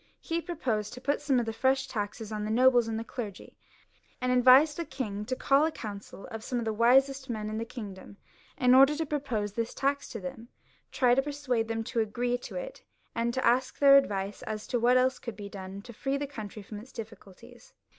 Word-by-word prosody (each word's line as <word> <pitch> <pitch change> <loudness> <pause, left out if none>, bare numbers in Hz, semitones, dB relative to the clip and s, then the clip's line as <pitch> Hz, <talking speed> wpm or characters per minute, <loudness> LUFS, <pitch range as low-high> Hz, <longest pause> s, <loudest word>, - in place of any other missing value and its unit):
He 335 0 -2
proposed 260 - -2
to 250 - -8
put 285 +3 -1
some 270 -4 +2
fresh 265 +3 +2
taxes 210 +1 -4
on 210 -1 -3
the 210 - -3
nobles 245 +1 +4
and 225 -1 -2
the 225 - -3
clergy, 220 -4 -7 0.6
and 250 0 0
advised 255 +4 +6
the 340 - -2
king 220 -9 -5
to 255 - -2
call 275 +3 +3
a 320 - +2
council 205 -6 -8
of 225 0 -6
some 245 +1 -2
of 235 - -3
tiie 220 - -1
wisest 265 +4 +3
men 215 -2 -3
in 215 - -3
the 230 - -3
kingdom, 205 -5 -9 0.4
in 250 -3 +4
order 270 +3 +7
to 320 +1 -2
propose 255 -9 -2
this 230 0 -3
tax 280 +1 -1
to - - -6
them, 265 -4 -7 0.4
try 255 -2 +3
to 265 - +4
persuade 270 -5 -2
them 225 0 -2
to 230 +1 -2
agree 240 +3 0
to - - -9
it, - - -6 0.3
and 235 +2 -1
ask 255 0 +2
their 275 -1 +7
advice 200 -7 +1
as 215 -1 -5
to 245 - -1
what 245 +2 +4
else 255 +1 +2
could 235 -3 -7
be 205 0 -8
done 195 0 -8
to 240 - -11
free 270 +5 -2
the 285 - -2
country 215 -6 -8
fix)m 205 +1 -8
its 250 - -15
difficulties. 220 - -12
245 Hz, 215 wpm, -29 LUFS, 215-270 Hz, 0.6 s, order